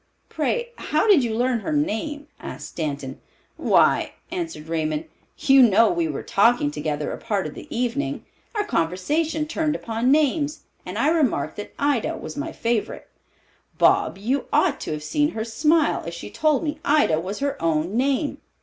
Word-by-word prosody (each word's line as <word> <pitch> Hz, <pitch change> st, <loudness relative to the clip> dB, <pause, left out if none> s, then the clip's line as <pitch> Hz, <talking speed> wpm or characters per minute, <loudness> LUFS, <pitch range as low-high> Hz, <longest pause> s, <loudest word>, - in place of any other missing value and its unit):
Pray, 480 Hz, -1 st, -1 dB
how 310 Hz, +5 st, 0 dB
did 375 Hz, -11 st, +6 dB
you 225 Hz, -2 st, -1 dB
learn 245 Hz, +1 st, +1 dB
her 315 Hz, -, -4 dB
name?" 295 Hz, 0 st, -1 dB
asked -, -, -7 dB
Stanton. 140 Hz, -4 st, -4 dB, 0.3 s
"Why," -, -, +3 dB, 0.2 s
answered 330 Hz, -, -5 dB
Raymond, 155 Hz, -1 st, -1 dB, 0.3 s
"you 270 Hz, -1 st, +5 dB
know 225 Hz, -1 st, +6 dB
we 170 Hz, -2 st, 0 dB
were 150 Hz, -, -4 dB
talking 205 Hz, -7 st, +3 dB
together 150 Hz, 0 st, -3 dB
a -, -, -6 dB
part 205 Hz, -4 st, -1 dB
of -, -, -5 dB
the -, -, -10 dB
evening. 250 Hz, +4 st, -2 dB, 0.3 s
Our 420 Hz, -, +1 dB
conversation 300 Hz, -, 0 dB
turned 305 Hz, -1 st, -1 dB
upon 230 Hz, +1 st, -1 dB
names, 300 Hz, +1 st, +2 dB, 0.3 s
and -, -, -5 dB
I 290 Hz, -, +3 dB
remarked 270 Hz, -, +1 dB
that 205 Hz, -, -8 dB
Ida 285 Hz, -5 st, 0 dB
was -, -, -7 dB
my 295 Hz, +3 st, -4 dB
favorite. 230 Hz, -6 st, -2 dB, 0.7 s
Bob, -, -, +3 dB
you 250 Hz, +8 st, -1 dB
ought 310 Hz, -7 st, +2 dB
to -, -, -5 dB
have 150 Hz, -1 st, -4 dB
seen 295 Hz, -, +1 dB
her 220 Hz, 0 st, -3 dB
smile 300 Hz, +8 st, +2 dB
as 170 Hz, -, -5 dB
she 170 Hz, -, -8 dB
told 310 Hz, -1 st, +1 dB
me 305 Hz, -1 st, -3 dB
Ida 285 Hz, -, +3 dB
was 190 Hz, +5 st, -4 dB
her 280 Hz, 0 st, -2 dB
own 165 Hz, +4 st, 0 dB
name. 275 Hz, +4 st, 0 dB
245 Hz, 170 wpm, -23 LUFS, -, 0.7 s, did